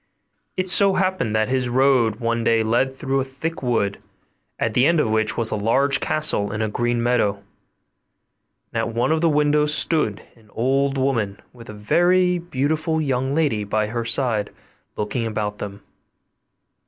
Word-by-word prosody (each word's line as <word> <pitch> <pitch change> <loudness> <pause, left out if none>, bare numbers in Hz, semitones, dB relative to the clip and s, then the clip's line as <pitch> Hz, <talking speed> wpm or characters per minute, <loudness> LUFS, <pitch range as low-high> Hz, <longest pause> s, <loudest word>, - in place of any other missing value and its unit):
It 185 0 -1
so 195 +1 +4
happened 185 - 0
that 110 0 +1
his 130 -1 -1
road 125 -3 +3
one 115 0 -2
day 115 0 +2
led 120 +4 +1
through 135 0 -2
a - - 0
thick 140 +5 -6
wood, 110 -6 -1 0.6
at 115 - -1
the 125 +4 +3
end 170 -1 +3
of 110 - +1
which 110 0 0
was 115 -1 +1
a - - 0
large 135 +7 +2
castle 125 -10 +1
in 105 +1 -2
a - - 0
green 120 +2 -1
meadow, 120 -4 +1 1.4
and - - -1
at - - -1
one 120 +5 +1
of 160 0 +1
the 170 - +3
windows 150 0 +2
stood 130 -11 +1
an 110 -3 -23
old 135 +4 0
woman 115 -7 -1
with 115 -2 -14
a - - -7
very 180 - +2
beautiful 160 0 -1
young 135 -2 -1
lady 145 -10 0
by 105 +1 -1
her 115 +2 -3
side 115 -3 0 0.5
looking 105 +3 -2
about 105 -1 -4
them. 100 0 -7
125 Hz, 170 wpm, -21 LUFS, 110-150 Hz, 1.4 s, so